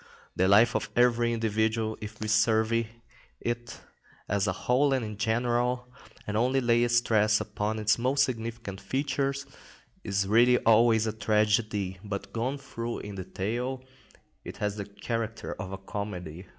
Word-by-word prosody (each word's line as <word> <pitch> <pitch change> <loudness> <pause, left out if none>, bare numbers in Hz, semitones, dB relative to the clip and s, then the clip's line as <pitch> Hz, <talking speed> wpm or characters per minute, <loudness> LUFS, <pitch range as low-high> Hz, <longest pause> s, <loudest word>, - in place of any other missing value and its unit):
The 95 - +2
life 110 +4 +5
of - - -1
every 120 -1 +3
individual, 110 0 0
if 105 0 -8
we 110 - -3
survey 110 +1 +2 0.5
it 120 0 -4 0.5
as 100 0 0
a - - +2
whole 135 +3 +2
and 130 -4 0
in 105 -1 -6
general, 120 +3 0 0.4
and 105 - -4
only 125 +4 +2
lay 120 -1 +3
stress 110 -3 +3
upon 105 +1 -3
its 110 +1 +2
most 135 +3 +3
significant 115 -5 -4
features, 140 +4 -1 0.6
is 100 -1 0
really 120 +4 +5
always 115 -1 +4
a 110 - -1
tragedy, 105 -3 +1
but 100 -1 -5
gone 125 +5 -1
through 120 -4 -5
in 105 - -7
detail, 110 +8 -3 0.6
it - - -8
has 105 -1 -2
the 100 - -4
character 110 +2 -4
of 95 0 -5
a 95 - -4
comedy. 95 -3 -6
110 Hz, 150 wpm, -28 LUFS, 105-120 Hz, 0.6 s, life